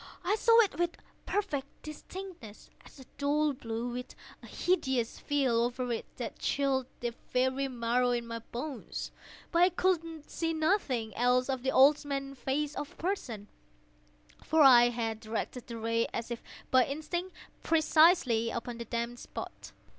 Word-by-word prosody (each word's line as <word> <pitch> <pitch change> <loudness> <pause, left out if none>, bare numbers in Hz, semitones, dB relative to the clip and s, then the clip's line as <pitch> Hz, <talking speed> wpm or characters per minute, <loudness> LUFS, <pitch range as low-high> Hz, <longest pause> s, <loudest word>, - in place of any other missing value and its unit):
I 400 - +2
saw 460 +1 +5
it 405 -6 -1
with 345 -1 0 0.3
perfect 335 -10 -1 0.2
distinctness—all 305 - -10
a - - -13
dull 295 +1 +2
blue, 235 -2 -4
with 250 +1 -6 0.3
a - - -12
hideous 265 -10 0
veil 265 -5 +1
over 245 +1 -1
it 225 - -4
that - - -5
chilled 270 -2 0
the 240 -1 -2 0.2
very 260 +2 +1
marrow 245 0 +1
in 240 -1 0
my 230 0 -5
bones; 250 +3 -6 0.4
but 340 - +3
I 360 - +7
could 330 -4 -1
see 330 -1 -2
nothing 295 - 0
else 250 +2 +2
of 260 -2 -1
the 265 - 0
old 285 +4 +6
man's 275 -2 -4
face 290 +2 -1
or - - -3
person: 280 - -4 1.0
for 315 0 +4
I 240 -3 +8
had 225 -2 -3
directed 225 +2 -4
the 235 -2 -6
ray 230 +1 0
as 235 +1 -4
if 235 - -4 0.3
by 260 -1 +6
instinct, 345 +6 -4 0.3
precisely 310 -8 +4
upon 235 0 -5
the 235 - -5
damned 235 +1 -3
spot. - - -8
265 Hz, 155 wpm, -31 LUFS, 235-310 Hz, 1.0 s, I